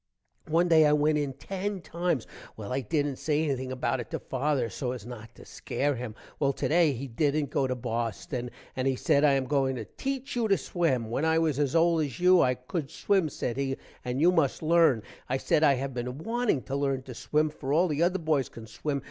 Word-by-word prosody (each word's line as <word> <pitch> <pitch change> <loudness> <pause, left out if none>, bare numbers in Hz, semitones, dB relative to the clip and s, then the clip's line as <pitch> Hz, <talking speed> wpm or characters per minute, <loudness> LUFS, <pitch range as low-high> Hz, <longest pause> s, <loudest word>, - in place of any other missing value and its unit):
one 165 +3 +3
day 160 -3 +6
i - - +4
went 150 +1 +3
in 145 -2 0
10 195 +8 -4
times. 170 -7 -1 0.3
well 110 +2 -5
i 135 - 0
dident 145 +2 -1
say 150 0 +1
anything 130 -4 -2
about 130 0 -1
it 120 - -6
to - - -2
father 135 -2 -1
so 125 +4 -3
as 120 -5 -8
not 115 -3 -9
to - - -14
scare 145 +1 -2
him. 120 -3 -6 0.2
well 140 -2 +2
today 160 +3 +2
he 135 +1 -5
dident 145 +3 0
go 135 -2 +1
to 130 - -1
Boston 120 +1 -3 0.3
and 130 +1 -1
he 135 - +2
said 145 +1 +2
i 145 -2 +5
am 135 -1 +1
going 135 -1 +1
to 115 -3 -5
teech 270 -1 -3
you 235 -2 +1
to 195 -2 +3
swim. 130 -11 -1
when 135 - -1
i 160 0 +3
was 155 -4 +1
as 145 0 0
old 165 0 +4
as 140 -5 -5
you 180 0 +6
i 125 0 +3
cood 135 +4 -5
swim 190 -3 +1
said 125 -3 -3
he, 135 -1 -1 0.3
and 125 +1 -2
you 170 +4 +5
must 160 -4 +1
lern, 160 -8 +4 0.3
i 130 - +1
said 150 - +1
i 140 -3 +6
have 135 +1 -4
been 125 +1 -4
wanting 225 - 0
to 135 - -7
lern 135 -2 0
to 130 - -8
swim, 150 +5 0
for 140 -2 -5
all 170 +5 +4
the 150 -1 -1
other 180 +2 +3
boys 155 -6 0
can 115 - -10
swim. 140 +6 -3
140 Hz, 230 wpm, -28 LUFS, 130-160 Hz, 0.3 s, day